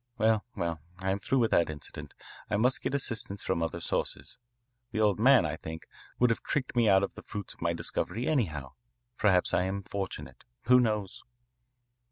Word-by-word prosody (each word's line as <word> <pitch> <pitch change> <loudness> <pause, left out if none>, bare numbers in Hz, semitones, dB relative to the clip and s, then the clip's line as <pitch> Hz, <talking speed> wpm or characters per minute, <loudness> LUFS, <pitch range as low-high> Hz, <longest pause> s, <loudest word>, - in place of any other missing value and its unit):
Well, 110 -1 +2
well, 85 -2 -2 0.2
I 95 +1 -1
am 100 - -1
through 135 - 0
with 115 -3 +2
that 85 - +3
incident. 75 -2 -8 0.3
I 105 - +1
must 125 +4 +2
get 140 - -1
assistance 110 -7 -3
from 95 -3 0
other 80 +1 -2
sources. 85 - -2 0.5
The 110 - -2
old 105 -2 +3
man, 130 -4 +6
I 75 0 -2
think, 80 0 -7 0.3
would 125 -1 +4
have 115 - -1
tricked 130 -4 -2
me 115 -3 +4
out 95 -1 +5
of - - -2
the - - -10
fruits 100 -3 -6
of - - -23
my 85 0 +1
discovery 115 +7 -2
anyhow. 80 - 0 0.5
Perhaps 95 -4 +3
I 90 - +3
am 100 +1 -3
fortunate. 100 0 -5 0.2
Who 125 +1 +6
knows?" 105 -5 -1
100 Hz, 190 wpm, -30 LUFS, 85-115 Hz, 0.5 s, man